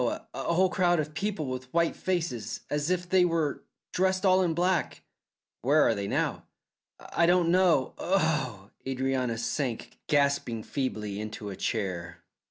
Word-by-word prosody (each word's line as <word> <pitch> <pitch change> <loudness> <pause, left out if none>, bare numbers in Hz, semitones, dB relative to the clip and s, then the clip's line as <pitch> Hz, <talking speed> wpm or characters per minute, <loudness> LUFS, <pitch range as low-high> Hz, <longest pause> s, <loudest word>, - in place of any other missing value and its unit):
a 120 - -1
whole 170 +7 +2
crowd 175 -2 +2
of 155 0 -3
people 195 -1 -2
with 130 -1 -5
white 170 -1 +2
faces, 165 -11 -2
as 150 +2 0
if 180 -1 0
they 185 0 +4
were 165 -4 0 0.3
dressed 190 +1 +1
all 185 0 +5
in 170 -3 +1
black." 180 0 0 0.6
"Where 145 +5 +4
are - - +3
they 100 -2 -3
now?" - - -1 0.7
"I 170 - +4
don't 175 -1 +4
know. 175 -7 +3
Oh!" 150 - 0
Adrianna 130 -2 -1
sank 120 0 -3
gasping 140 -6 +1
feebly 105 -7 -3
into 105 -1 -6
a - - -6
chair. 85 -6 -3
150 Hz, 150 wpm, -28 LUFS, 120-175 Hz, 0.7 s, all